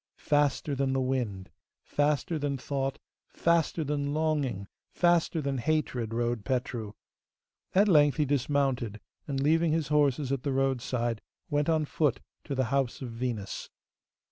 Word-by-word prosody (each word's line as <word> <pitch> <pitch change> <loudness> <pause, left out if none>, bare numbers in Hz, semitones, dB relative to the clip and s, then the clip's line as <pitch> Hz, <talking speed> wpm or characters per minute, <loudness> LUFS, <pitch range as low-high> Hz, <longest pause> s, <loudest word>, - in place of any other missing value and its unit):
Faster 145 0 +1
than 135 -1 0
the 135 - +1
wind, 125 -8 -2 0.3
faster 150 +2 0
than 140 -1 -1
thought, 135 0 -2 0.3
faster 170 -1 +1
than 145 0 -1
longing, 145 -11 0 0.2
faster 175 -2 +2
than 135 -1 -1
hatred 125 -5 -1
rode 120 -1 -1
Petru. 120 -3 -2 0.8
At 200 +3 +5
length 150 -6 +5
he 150 - +2
dismounted, 135 -5 0 0.3
and, 140 -2 -2
leaving 160 +3 +3
his 160 -3 0
horses 145 -2 +2
at 135 -2 0
the 140 +1 -1
roadside, 125 -3 0 0.3
went 145 +1 +1
on 160 -2 +2
foot 145 -3 +1 0.3
to 140 - -3
the 130 -1 +1
house 135 -1 0
of 120 - -5
Venus. 115 -4 -4
140 Hz, 145 wpm, -29 LUFS, 125-150 Hz, 0.8 s, At